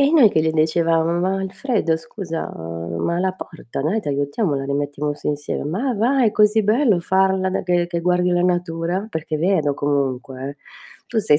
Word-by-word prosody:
E 280 +1 +4
noi 270 -10 +7
che 160 - +2
gli 160 0 +1
dicevamo:"Ma 165 +3 +2
Alfredo 190 -3 0
scusa, 165 0 -5
ma 85 - -3
la 190 +1 +1
porta, 165 -9 -7
noi 170 +11 0
t'aiutiamo, 145 +4 -1
la 135 0 -2
rimettiamo 145 +1 -2
su 145 - -9
insieme". 145 -1 -3
"Ma 220 - -1
va 250 +6 +2
è 220 - +4
così 210 +1 +4
bello 215 -1 +3
farla 190 +1 +2
be - - -1
che 175 -1 +2
che 170 -1 -2
guardi 180 +1 +2
la 175 0 +2
natura." 175 +2 -1
Perché 160 -3 -3
è - - -6
vero 160 -4 +2
comunque, 135 -2 -2
eh. 145 - -12 0.5
Tu 230 - -1
sei 150 -8 +4
170 Hz, 185 wpm, -21 LUFS, 145-190 Hz, 0.5 s, noi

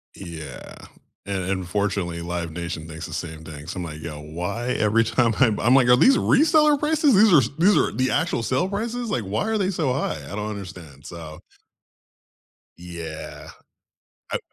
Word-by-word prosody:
Yeah. 80 -7 -9 0.5
And 100 -2 -2
unfortunately, 95 -2 -2
Live 85 -1 -4
Nation 85 -1 -5
thinks 80 +1 -7
the - - -8
same 80 -1 -6
thing, 75 0 -10
so 95 - -6
I'm 90 - -3
like, 75 -2 -7
"Yo, 80 -2 -6
why 90 +10 -4
every 110 +2 +3
time 115 -1 +1
I" 130 - +7 0.2
I'm 125 +3 +6
like, 130 -3 +5
"Are 125 - +7
these 270 - +6
reseller 300 -1 +4
prices? 300 -2 +3
These 210 -1 +6
are 155 - +8
s 120 -3 0
these 200 +5 +5
are - - +2
the 130 0 0
actual 165 -8 0
sale 130 +10 0
prices? 230 +4 -3
Like, 120 -4 -1
why 105 - -2
are 220 - +1
they 190 -2 0
so 160 -8 0
high?" 125 - -2
I 95 +8 -7
don't 105 +1 -3
understand. 90 -9 -9
So 80 -3 -9 1.4
Yeah. 85 -3 -8 0.8
Uh - - +1
100 Hz, 180 wpm, -23 LUFS, -, 1.4 s, are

